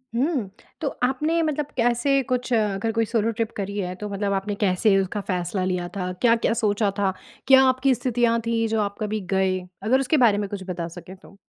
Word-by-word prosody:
हुँ, 260 - 0 0.3
तो 300 - -1 0.2
आपने 305 +6 +1
मतलब 300 -2 -2
कैसे 245 +3 +2
कुछ 250 -1 -2
अगर 210 0 +1
कोई 225 0 +1
सोलो 225 0 0
ट्रिप 230 0 -2
करी 200 0 -4
है, 180 -2 -3
तो 210 +3 -6
मतलब 200 0 -1
आपने 200 +1 -2
कैसे 195 0 +2
उसका 195 +2 -2
फ़ैसला 185 0 -2
लिया 180 -1 -1
था? 180 -1 -2
क्या-क्या 230 -2 +3
सोचा 210 -3 +1
था, 190 -2 +1 0.3
क्या 265 0 +8
आपकी 260 +1 +2
स्थितियाँ 240 -1 +1
थी, 230 -1 +1
जो 220 0 0
आप 200 -1 -2
कभी 215 0 -1
गए? 190 -1 +2 0.2
अगर 255 +5 +3
उसके 270 +4 +1
बारे 230 -6 +4
में 205 -1 -2
कुछ 200 -2 -5
बता 170 -2 -3
सकें 175 +2 -10
तो। 195 +1 -18
215 Hz, 205 wpm, -24 LUFS, 195-245 Hz, 0.3 s, क्या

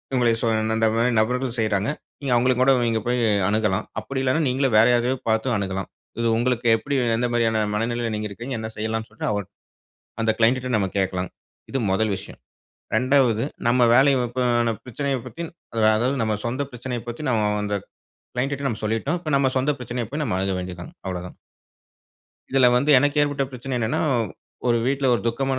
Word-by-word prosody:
உங்களுக் 120 -2 +2
சொல் 110 -1 +1
அந்த 110 0 +3
மாரி 120 +2 +2
நபர்கள் 125 +2 0
செய்றாங்க. 105 -2 +1 0.3
நீங்க 140 -3 -3
அவுங்கள 125 +2 +3
கூட 135 +1 +5 0.2
நீங்க 115 -1 +1
போய் 125 +1 +1 0.3
அணுகலாம். 105 -1 +1
அப்படி 130 +4 -4
இல்லன்னா 130 +5 +1
நீங்களே 130 +1 +1
வேற 110 +1 +7
யாரையாவது 125 +2 +1
பாத்தும் 110 +3 +1
அணுகலாம். 95 -1 -3 0.3
இது 115 - +1
உங்களுக்கு 120 0 0
எப்படி, 140 +5 -3 0.2
எந்த 120 +2 0
மாரியான 115 -2 +2
மனநிலையில 115 +1 -1
நீங்க 105 0 -3
இருக்கீங்க, 120 +6 -6
என்ன 110 - -4
செய்யலாம்ன்னு 110 +1 -3
சொல்லிட்டு, 105 - -4
அவர் 105 -2 -2 0.8
அந்த 110 -1 +3
க்ளையண்ட்டுட்ட 125 +2 +2
நம்ம 100 -2 0
கேக்கலாம். 95 -2 -1 0.4
இது 135 - 0
1 105 +2 +1
விஷயம். 95 - -10 0.6
2வது 125 -3 +3 0.2
நம்ம 125 +1 +3
வேலைய, 135 -1 +4
இப்ப 125 +2 -2 0.2
அந்த 115 -1 0
பிரச்சனயப் 135 0 -3
பத்தி 170 - -7 0.3
அது 110 - 0
அதாவது 125 +5 +1
நம்ம 110 -1 0
சொந்த 130 +4 -1
பிரச்சனையப் 120 -1 -5
பத்தி, 120 +6 -6
நம்ம 110 -3 +2 0.2
அந்த 105 0 -1 0.6
க்ளையண்ட் 135 +3 -1
டுட்ட 140 0 -2
நம்ம 110 -1 -4
சொல்லிட்டோம். 115 +10 0
இப்போ 155 -3 -4
நம்ம 135 -1 +2
சொந்த 140 +3 +1
பிரச்சனைய 120 -2 -4
போய், 150 +1 -2
நம்ம 105 -8 -1
அணுக 95 0 0
வேண்டியது 90 -1 -6
தான். - - -12
அவ்ளோதான். 90 -1 -5 1.1
இதுல 135 -1 +5
வந்து 140 +4 +2
எனக்கு 145 +2 +1
ஏற்பட்ட 145 -1 0
பிரச்சனை 130 0 -4
என்னென்ன, 110 0 0 0.7
ஒரு 120 - +4
வீட்ல 135 0 +1
ஒரு 115 - 0
துக்கமான 135 +2 -1
120 Hz, 180 wpm, -23 LUFS, 110-130 Hz, 1.1 s, வேற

